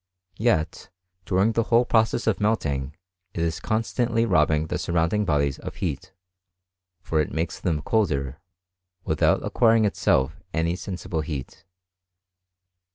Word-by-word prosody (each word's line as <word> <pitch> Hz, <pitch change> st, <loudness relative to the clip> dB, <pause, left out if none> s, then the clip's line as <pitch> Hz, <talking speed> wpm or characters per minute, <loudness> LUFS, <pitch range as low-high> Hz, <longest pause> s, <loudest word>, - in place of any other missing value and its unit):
Yet, 105 Hz, -9 st, 0 dB, 0.4 s
during 100 Hz, +3 st, +2 dB
the 115 Hz, -, +1 dB
whole 120 Hz, +1 st, +4 dB
process 115 Hz, 0 st, +2 dB
of 110 Hz, -3 st, +1 dB
melting, 75 Hz, -10 st, -1 dB, 0.4 s
it 85 Hz, -, -1 dB
is 80 Hz, -1 st, -1 dB
constantly 115 Hz, +1 st, 0 dB
robbing 80 Hz, -5 st, +2 dB
the -, -, -3 dB
surrounding 85 Hz, +5 st, 0 dB
bodies 70 Hz, -4 st, +1 dB
of -, -, -7 dB
heat; -, -, -4 dB, 0.9 s
for 80 Hz, -2 st, +1 dB
it 75 Hz, -, -3 dB
makes 80 Hz, +1 st, -3 dB
them 80 Hz, -5 st, -1 dB
colder, 70 Hz, -, 0 dB, 0.7 s
without 80 Hz, -, +2 dB
acquiring 115 Hz, -2 st, +3 dB
itself 85 Hz, -4 st, +1 dB
any 85 Hz, +1 st, +1 dB
sensible 90 Hz, -4 st, -4 dB
heat. 75 Hz, -4 st, -7 dB
85 Hz, 125 wpm, -25 LUFS, 75-110 Hz, 0.9 s, whole